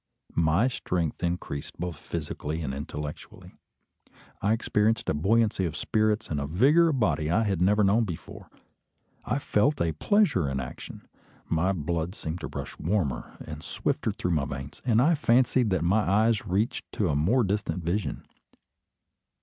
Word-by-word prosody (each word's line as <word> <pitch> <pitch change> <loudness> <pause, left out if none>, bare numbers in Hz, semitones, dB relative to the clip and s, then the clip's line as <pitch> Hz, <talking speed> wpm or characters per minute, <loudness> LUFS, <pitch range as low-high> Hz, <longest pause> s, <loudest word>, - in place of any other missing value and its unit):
My 85 +8 +3
strength 90 - -2
increased, 85 -5 -3
both 90 -1 -3
physically 80 0 -4
and 65 -3 -3
intellectually. 75 +1 -7 0.9
I 105 - +2
experienced 110 0 +1
a - - +2
buoyancy 105 +6 +2
of 80 -3 -3
spirits 110 -2 0
and 75 - 0
a 70 - -3
vigour 140 - +4
of 140 -5 0
body 80 -8 +1
I 100 +7 +3
had 95 -5 -1
never 105 +3 +4
known 105 +4 +4
before. 85 -6 -8 0.8
I 125 - 0
felt 140 +2 +1
a 85 - +1
pleasure 95 - +2
in 70 0 -2
action. 65 -1 -8 0.4
My 85 +3 +1
blood 85 +1 -2
seemed 80 +2 -5
to - - -5
rush - - -7
warmer 80 - -1
and - - -7
swifter - - -1
through 90 - -3
my 75 -4 +1
veins, 70 +1 -7
and 120 -1 +3
I 165 +4 +4
fancied 125 -4 +3
that 95 -4 +1
my 95 +6 +3
eyes 105 +2 +2
reached 105 +8 -1
to 100 -5 0
a 70 - +1
more 100 - +3
distant 100 -3 -2
vision. 90 +6 -2
95 Hz, 160 wpm, -27 LUFS, 80-110 Hz, 0.9 s, vigour